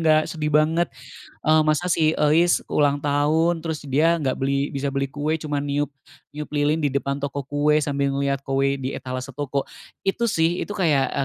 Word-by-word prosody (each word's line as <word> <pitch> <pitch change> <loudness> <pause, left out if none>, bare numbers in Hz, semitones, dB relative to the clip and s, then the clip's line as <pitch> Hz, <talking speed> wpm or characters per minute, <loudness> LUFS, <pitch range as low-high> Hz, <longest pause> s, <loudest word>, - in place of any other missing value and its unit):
nggak, 155 -1 +4
sedih 150 -2 -2
banget, 155 +3 +2 0.6
eee, 155 0 +6
masa 155 +3 +1
si 160 -3 +3
Euis 160 +4 +4
ulang 145 -1 +2
tahun 155 +4 +1
terus 160 -2 -3
dia 160 +5 +3
gak 130 -3 -1
beli 140 +1 0
bisa 140 -1 -3
beli 140 -1 -1
kue 150 +3 -2
cuma 145 -2 -2
niup 145 +1 -1 0.4
niup 150 +1 -7
lilin 145 +1 +2
di 145 -4 -1
depan 140 0 -1
toko 140 0 -3
kue 145 +2 +1
sambil 140 -1 -1
ngeliat 140 0 -1
kue 135 0 +1
di 135 0 -4
etalase 130 0 -5
toko," 140 -1 -2 0.4
itu 235 +5 0
sih, 165 -2 +1
itu 205 - -5
kayak 140 -6 +1
145 Hz, 180 wpm, -23 LUFS, 140-160 Hz, 0.6 s, eee